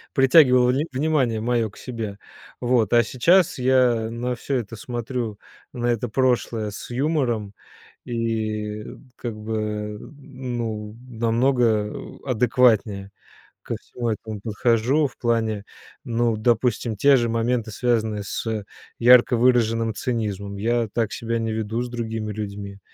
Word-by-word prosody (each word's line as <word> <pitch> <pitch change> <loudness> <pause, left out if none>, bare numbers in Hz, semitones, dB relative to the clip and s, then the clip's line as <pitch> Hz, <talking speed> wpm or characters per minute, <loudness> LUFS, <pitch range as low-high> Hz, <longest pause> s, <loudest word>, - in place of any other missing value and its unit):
притягивало 130 -3 +6
вн 135 - +1
внимание 130 -4 +1
моё 115 -1 +1
к - - -18
себе. 115 -5 -6 0.4
Вот. 120 -4 +2
А 120 0 +6
сейчас 170 - +3
я 125 -3 +3
на 120 +2 -3
всё 135 +3 -3
это 115 -3 -3
смотрю, 120 -1 -4 0.3
на 120 -2 -3
это 120 0 0
прошлое 120 -4 0
с - - -8
юмором 120 -6 -1 0.5
и, 110 -3 -2
э, - - -10 0.3
как 120 -4 -5
бы 110 +1 -6 0.5
н - - -12 0.5
ну 110 -2 -4
намного 115 -2 +1 0.3
адекватнее 110 -5 +2 0.5
ко - - -4
всему 120 -2 -4
этому 110 -1 -5
подхожу 115 +7 +1
в 130 - -10
плане, 110 -3 0 0.4
ну, 115 -1 0
допустим, 115 0 +1
те 140 +5 +5
же 120 -2 +1
моменты 115 0 0
связанные 110 -2 0
с 110 +1 -3 0.3
ярко 120 0 +6
выраженным 115 -2 +2
цинизмом: 100 -5 -3
я 115 +2 0
так 115 -2 -1
себя 115 0 -2
не 115 -1 -2
веду 110 +2 -2
с 125 - -4
другими 115 -3 -4
людьми 100 -1 -6
115 Hz, 135 wpm, -23 LUFS, 110-125 Hz, 0.5 s, притягивало